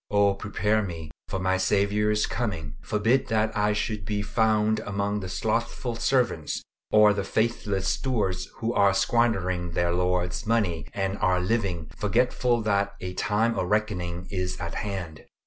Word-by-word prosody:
Oh 100 -1 +4
prepare 105 +2 0
me 80 -6 -6 0.2
for - - -3
my 95 0 +1
Saviour's 105 +2 +2
coming. 85 -11 -3
Forbid 115 +5 +1
that 110 0 +1
I 105 0 +2
should 105 -1 -2
be 105 +1 -2
found 110 0 +2
among 100 -1 -2
the 95 -2 -6
slothful 115 +4 -1
servants 120 - 0 0.3
or 105 -1 +6
the 100 -1 -2
faithless 105 -2 -1
stewards 105 -9 -1
who 115 +1 -2
are 100 -1 +4
squandering 95 -9 +1
their 85 0 +1
Lord's 90 +2 0
money, 100 -9 +1
and 95 0 -1
are 90 0 +2
living, 90 -5 -1
forgetful 120 +2 +1
that 100 -1 +1
a 90 0 -5
time 110 +5 +1
of 90 - -2
reckoning 90 -5 -1
is 90 -2 -2
at 85 -2 -4
hand! 90 -7 -5
100 Hz, 150 wpm, -26 LUFS, 90-110 Hz, 0.3 s, or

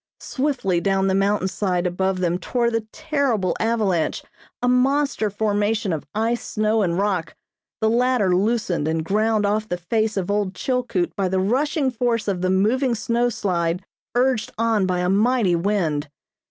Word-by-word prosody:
Swiftly 255 -11 -1
down 195 0 +1
the 190 - +2
mountain 195 0 +1
side 185 -1 -1
above 185 +1 -1
them 175 0 0
tore 235 +3 0
the 225 -1 -2
terrible 280 - 0
avalanche, 215 -7 0 0.4
a - - +2
monster 260 -2 +2
formation 205 -1 0
of 155 - -5
ice, 230 +2 0
snow 215 0 0
and 175 -3 0
rock, 190 -4 -1 0.5
the 220 - +3
latter 235 -5 +2
loosened 195 -6 0
and 160 0 -1
ground 215 +2 +1
off 215 +1 0
the 180 - -1
face 215 +4 -1
of 195 0 -1
old 205 -2 -1
Chilkoot 245 -9 -1
by 195 -2 0
the 190 +1 0
rushing 265 - +1
force 235 -2 -1
of 190 -3 -1
the 185 - +1
moving 235 +7 +2
snowslide 200 -7 -1 0.3
urged 245 -2 +1
on 220 -4 +1
by 180 -1 0
a 180 - 0
mighty 210 -1 +2
wind. 170 -5 0
210 Hz, 160 wpm, -22 LUFS, 185-235 Hz, 0.5 s, the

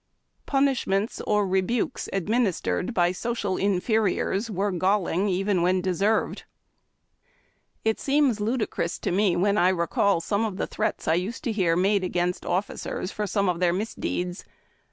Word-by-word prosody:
Punish 275 -2 +1
ments 195 +3 0
or 210 -1 +2
rebukes 190 +7 -1
administered 195 - 0
by 175 -6 +2
social 205 -1 -2
inferiors 200 +1 0
were 200 0 -1
galling: 185 +1 +1
even 190 0 +1
when 185 +2 +2
deserved. 190 +4 0 1.4
It 220 0 +1
seems 275 -5 +2
ludicrous 215 -6 -1
to - - -3
me 190 -1 +2
when 200 +4 +2
I 180 - +5
recall 185 +1 +1
the 205 +3 -1
threats - - -3
I 160 - +4
used 190 - -2
to 240 - -1
hear 185 -6 +1
made 195 +3 +2
agains^ 180 -1 -1
oiiticers 185 +1 -3
for 210 -1 -2
some 200 0 0
of 175 -2 0
their 175 -1 +2
misdeeds. 180 -2 -3
195 Hz, 140 wpm, -25 LUFS, 180-215 Hz, 1.4 s, I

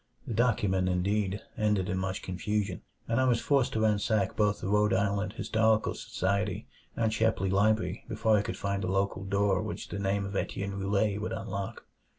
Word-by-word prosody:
The - - -4
document, 100 -5 +2
indeed, 100 +2 0
ended 105 -4 +1
in 95 - -1
much 95 0 -3
confusion; 100 +1 -2 0.3
and 115 +3 +2
I - - +3
was 120 -3 +3
forced 135 -2 +2
to 110 - 0
ransack 105 -2 +1
both 105 -1 +2
the - - -4
Rhode 105 +1 +3
Island 100 +1 0
Historical 110 0 +2
Society 100 +1 -2 0.3
and 110 -2 +1
Shepley 110 -4 +1
Library 110 +3 +2
before 110 0 +2
I 105 - +3
could - - -4
find 100 0 -2
a - - -1
local 95 0 0
door 100 -1 +1
which - - -5
the 100 - -4
name 100 0 0
of 100 0 -6
Etienne 100 0 -2
Roulet 100 +1 +1
would 110 - -3
unlock. 100 -1 -5
100 Hz, 180 wpm, -29 LUFS, 95-110 Hz, 0.3 s, I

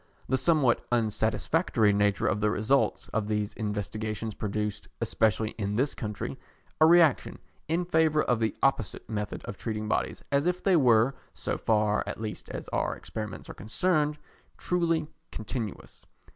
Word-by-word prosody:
The 130 - +2
somewhat 145 -4 +3
unsatisfactory 110 - +2
nature 100 -1 +2
of 105 - +1
the 105 - +3
results 110 +7 +1
of 110 -2 -1
these 105 -1 -1
investigations 110 +1 -3
produced, 105 0 -3
especially 110 0 +1
in 100 0 -1
this 135 +5 +1
country, 105 -3 -5 0.4
a 155 - +7
reaction 165 -4 +4 0.3
in 170 +3 0
favour 160 -3 +3
of 120 -2 +1
the 110 -2 0
opposite 135 -7 0
method 105 -2 -4
of 100 - -6
treating 110 -2 -3
bodies - - -1
as 140 +3 +2
if 180 0 -1
they 195 -2 +4
were, 125 -3 +5 0.2
so - - -2
far 105 -1 +1
at - - -5
least 110 -1 -5
as - - -6
our - - -1
experiments 105 -3 -7
are - - -7
concerned, 150 - 0 0.4
truly 170 -3 0 0.3
continuous. 110 -1 -6
110 Hz, 150 wpm, -28 LUFS, 105-150 Hz, 0.4 s, a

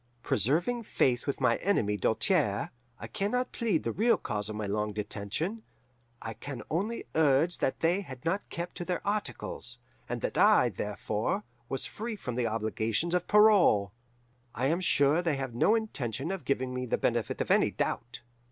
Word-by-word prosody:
Preserving 170 - +1
faith 130 - +1
with 140 - -1
my 125 -3 +3
enemy 115 - +1
Doltaire, 110 - +1 0.3
I - - -7
can 200 -1 -2
not 250 +2 -1
plead 215 -9 0
the - - -1
real 230 +3 +3
cause 105 0 -3
of 110 - -5
my 105 0 -3
long 105 +1 -1
detention; 105 - -3 0.6
I 110 - -4
can 120 +1 -7
only 205 +9 -1
urge 160 +2 +3
that 130 - -1
they 175 +4 +2
had 130 -9 -10
not 190 +5 -1
kept 170 +1 -5
to - - -3
their 180 - -3
articles, 200 -11 -3 0.3
and - - -3
that - - -1
I, - - +6
therefore, 105 - -2 0.3
was 135 - -2
free 225 +1 -5
from 125 -11 -5
the 120 -1 0
obligations 110 +7 -1
of 180 -1 0
parole. 205 - +5 0.6
I 125 - -1
am 165 +6 +2
sure 145 -2 +3
they 165 -4 0
have 135 -3 -4
no 205 - +4
intention 140 - -2
of 195 -2 -5
giving 130 -2 0
me 125 0 -3
the - - +1
benefit - - -1
of - - -1
any - - +4
doubt. 115 +1 -3
140 Hz, 180 wpm, -30 LUFS, 115-190 Hz, 0.6 s, I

